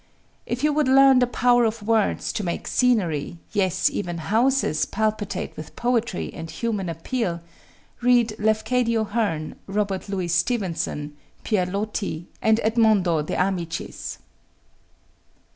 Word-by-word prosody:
If 245 +3 -3
you 300 0 +3
would 300 -2 +2
learn 270 0 +6
the 250 - +3
power 245 0 +3
of 220 -1 -1
words 220 -1 +1
to 210 - -2
make 170 -2 -3
scenery, 175 - +1
yes, 190 -3 +1
even 175 -4 -3
houses, 215 - +1
palpitate 215 -1 -2
with 155 0 -9
poetry 240 -4 -1
and 165 -1 -7
human 200 +2 -2
appeal, 170 +2 -2 0.6
read 240 -2 +3
Lafcadio 225 +2 +1
Hearn, 205 -8 -2
Robert 200 -1 -2
Louis 185 -3 -2
Stevenson, 170 -5 -1 0.3
Pierre 190 -5 +1
Loti, 200 -3 -3 0.2
and 220 0 +3
Edmondo 215 -7 +3
De 150 - -4
Amicis. 180 -3 -3
210 Hz, 125 wpm, -24 LUFS, 175-235 Hz, 0.6 s, learn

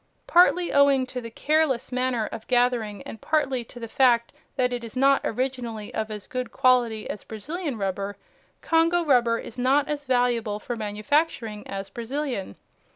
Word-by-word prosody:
Partly 355 0 +4
owing 280 -2 +5
to 255 0 -6
the 230 - -7
careless 280 0 0
manner 250 -3 0
of 220 +1 -8
gathering 240 -5 +1
and 225 - -9
partly 275 -5 0
to 245 - -12
the 230 - -6
fact 235 -1 +3 0.2
that 250 -2 +1
it 240 -1 -4
is 230 0 -8
not 275 +1 +4
originally 240 -3 -3
of 220 0 -2
as 210 -2 -6
good 255 -2 -4
quality 240 -4 +2
as - - -6
Brazilian 285 - -5
rubber, 195 0 -3 0.5
Congo 330 +1 +3
rubber 240 -5 +3
is 235 +1 -8
not 275 +3 +3
as 290 -1 -3
valuable 245 -4 +1
for 240 +3 -5
manufacturing 215 +1 -1
as 195 0 -6
Brazilian. 240 - -4
245 Hz, 160 wpm, -25 LUFS, 220-275 Hz, 0.5 s, owing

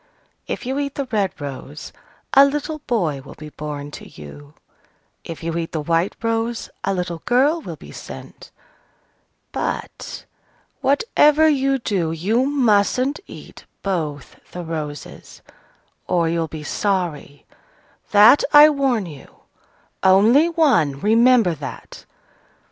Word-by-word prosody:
If - - -5
you 265 +3 -2
eat 280 -1 -3
the 280 - -2
red 200 -6 -1
rose, 140 +1 -8 0.4
a 275 - +8
little 295 +2 -1
boy 170 - 0
will 135 - -13
be 155 0 -10
born 145 -1 -7
to - - -10
you: 140 - -13 0.7
if 165 0 -8
you 165 0 -3
eat 165 - -5
the 160 - -1
white 165 +4 0
rose, 230 +1 -2
a - - 0
little 180 -3 -3
girl 280 +7 +2
will - - -7
be - - -13
sent. - - -11 1.0
But, - - -5 0.6
whatever 300 - +3
you 275 -2 +2
do, 190 -9 -1
you 215 +11 0
mustn't 255 0 +2
eat - - -12 0.2
both 155 -8 -4
the 180 - -5
roses, 150 -4 -7 0.6
or 170 -2 +1
you'll 165 0 -1
be 155 -1 -8
sorry, 170 -5 -3 0.6
that 215 +7 +7
I 300 +1 +9
warn 265 -7 0
you! 150 -5 -13 0.6
Only 220 - +5
one: 245 - +2
remember 230 - +4
that!" 150 -3 -9
195 Hz, 125 wpm, -21 LUFS, 160-265 Hz, 1.0 s, I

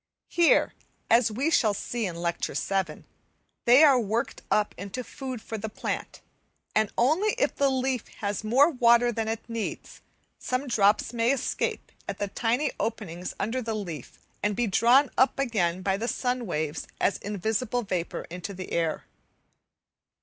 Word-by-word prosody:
Here, 345 -1 +4 0.4
as 230 -1 +5
we 270 +9 0
shall 215 -10 +3
see 230 +1 -2
in 175 - -5
Lecture 170 0 -2
VII., 190 -6 -1 0.6
they 250 +6 +7
are 275 -4 +7
worked 225 +1 -2
up 210 -1 +2
into 200 +6 -6
food 255 -1 -7
for 220 - -5
the 220 +2 -4
plant, - - -5 0.5
and 215 -1 +2
only 320 - +3
if - - +1
the 280 -1 +3
leaf 260 -2 -1
has 205 0 -3
more 265 +9 +4
water 240 -2 +4
than 225 -1 -2
it 225 0 -4
needs, 230 -2 -5 0.4
some 255 +2 -2
drops 210 -1 +3
may 235 +1 +2
escape 275 -3 -2 0.2
at 200 - -3
the 205 - -2
tiny 245 +8 0
openings 180 -6 -4
under 240 +5 -1
the 225 -2 -3
leaf, 170 - -6 0.2
and 205 0 0
be 240 - +1
drawn 240 +7 +4
up 260 - +4
again 185 -9 0
by 195 0 +1
the 230 +3 -3
sun 245 -2 -1
waves 155 -3 -3
as 200 - +1
invisible 220 +4 -1
vapour 180 -4 -3
into 180 +3 -6
the 185 0 -7
air. 165 -2 0
225 Hz, 160 wpm, -27 LUFS, 200-250 Hz, 0.6 s, they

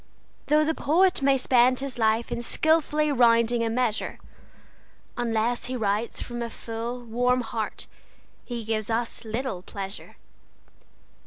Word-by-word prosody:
Though 305 +1 +4
the 320 - +1
poet 355 +4 +2
may 275 0 +4
spend 255 0 +4
his 270 -2 -4
life 220 +1 +1
in 235 - -2
skilfully 305 +3 +2
rounding 235 -2 +4
a 225 - 0
measure, 230 -2 -1 1.0
Unless 235 0 0
he 255 - -4
writes 215 0 -1
from 240 0 -6
a 235 - -3
full, 230 +2 -6
warm 245 +2 +1
heart 225 -2 -4 0.6
he 235 -3 -6
gives 215 -1 -2
us 230 +1 -1
little 225 -3 -3
pleasure. 195 +1 -7
240 Hz, 135 wpm, -26 LUFS, 225-255 Hz, 1.0 s, Though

